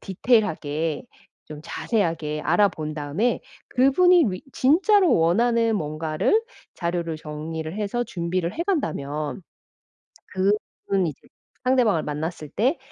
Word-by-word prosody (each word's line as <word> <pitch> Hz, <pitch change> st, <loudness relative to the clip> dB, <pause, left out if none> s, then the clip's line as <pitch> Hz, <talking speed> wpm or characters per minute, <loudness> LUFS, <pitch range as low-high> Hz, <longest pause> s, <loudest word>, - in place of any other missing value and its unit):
디테일하게 165 Hz, -, 0 dB, 0.4 s
좀 150 Hz, -1 st, -9 dB
자세하게 165 Hz, -8 st, -1 dB
알아본 165 Hz, -4 st, +1 dB
다음에 155 Hz, +11 st, -1 dB, 0.3 s
그분이 335 Hz, +7 st, +5 dB
뤼 185 Hz, -, -3 dB, 0.2 s
진짜로 360 Hz, -, +4 dB
원하는 230 Hz, +7 st, +3 dB
뭔가를 155 Hz, -, 0 dB, 0.3 s
자료를 170 Hz, -2 st, -2 dB
정리를 155 Hz, +1 st, -6 dB
해서 215 Hz, +3 st, -1 dB
준비를 175 Hz, -2 st, -2 dB
해 335 Hz, -, -1 dB
간다면 155 Hz, -, -2 dB, 1.4 s
그분 195 Hz, -3 st, +1 dB
이제 150 Hz, -, -8 dB, 0.4 s
상대방을 245 Hz, -10 st, +3 dB
만났을 150 Hz, +1 st, -4 dB
때 255 Hz, -, +1 dB
175 Hz, 260 characters per minute, -24 LUFS, 155-240 Hz, 1.4 s, 그분이